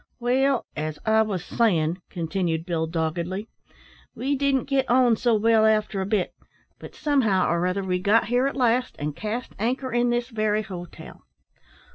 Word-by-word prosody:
"Well, 260 +2 +1
as 155 0 -3
I 220 0 +4
wos 200 -6 -2
sayin'," 175 -7 +1
continued 170 -2 -2
Bill, 165 -2 -1
doggedly, 170 +5 -3 0.7
"we 275 +3 -1
didn't 275 -1 +1
git 275 -2 0
on 245 -1 +4
so 230 +1 +2
well 220 +1 +3
after 215 -2 +2
a 190 - -3
bit; 205 -3 0 0.5
but - - -11
somehow 230 -11 +2
or 170 +1 +1
other 190 +2 -1
we 180 -1 -1
got 210 +4 +3
here 245 +4 +1
at 275 - -4
last, 250 0 +1
and 145 0 -4
cast 220 +3 -4
anchor 255 +4 -1
in 240 0 +2
this 240 0 -1
very 215 -2 0
hotel. 180 -3 -10
215 Hz, 165 wpm, -24 LUFS, 180-245 Hz, 0.7 s, I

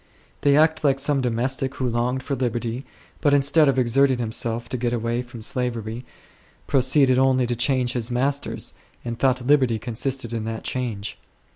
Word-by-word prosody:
They 145 0 +4
act 155 0 +3
like 135 -2 +2
some 145 0 +1
domestic 130 +2 -1
who 130 - -2
longed 125 +2 -1
for 140 - -3
liberty, 120 0 -3 0.3
but 145 -2 +4
instead 145 +2 +4
of 135 - +1
exerting 130 +2 +3
himself 115 0 -3
to 130 - -2
get 120 0 -1
away 120 +1 -1
from 120 -2 -10
slavery 120 -1 -3 0.6
proceeded 130 0 +3
only 130 -1 +3
to 120 0 -2
change 125 0 +1
his 120 -1 -2
masters, 135 +3 -2 0.3
and 120 0 -4
thought 130 -1 +1
liberty 130 -5 +3
consisted 120 +1 -3
in 115 -2 -2
that 110 0 -5
change. 115 -5 -4
125 Hz, 165 wpm, -23 LUFS, 120-135 Hz, 0.6 s, They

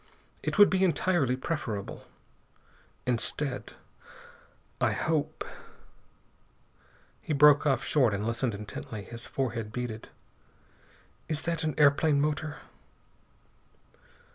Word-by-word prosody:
It - - -2
would 205 -1 +8
be 190 0 +2
entirely 170 -7 +2
preferable. 130 - -4 1.0
Instead, 125 +1 -2 1.1
I - - +3
hope 155 -1 -1 0.9
" - - -34
He 155 - -2
broke 150 +1 +6
off 135 - +2
short 130 -7 +3
and 100 +1 -2
listened 115 0 -1
intently. 105 0 -7
His 115 +3 -8
forehead 115 -5 -3
beaded. 115 -2 -5 1.2
"Is 155 -1 -2
that 165 -1 -1
an 155 -1 -1
airplane 145 0 +4
motor?" 150 +1 -1
140 Hz, 100 wpm, -29 LUFS, 115-155 Hz, 1.2 s, would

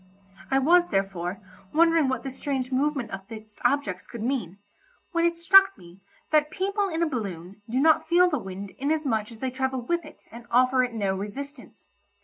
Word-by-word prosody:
I 270 - +2
was, 345 +6 +4
therefore, 195 -1 -2 0.4
wondering 330 -2 +4
what 260 -2 -2
this 270 -1 -6
strange 265 -3 -3
movement 270 -3 0
of 195 0 -7
fixed 215 -1 -11
objects 245 -8 0
could 235 -3 -7
mean, 230 -8 -2 0.5
when 335 -1 +1
it 340 0 +1
struck 385 +1 +6
me 175 0 -15 0.3
that 300 -1 +3
people 395 +4 -1
in 330 -1 -1
a - - +2
balloon 200 - -5
do 250 +3 0
not 315 +2 +4
feel 355 +1 +5
the 300 -6 -1
wind 195 -1 -7
inasmuch 275 -7 -1
as 225 - -13
they 260 -1 -1
travel 265 0 -2
with 340 +7 -1
it - - -14
and 235 +1 -11
offer 255 +1 +4
it 245 -2 -3
no 200 -3 0
resistance. 270 +9 -8
260 Hz, 185 wpm, -26 LUFS, 210-310 Hz, 0.5 s, struck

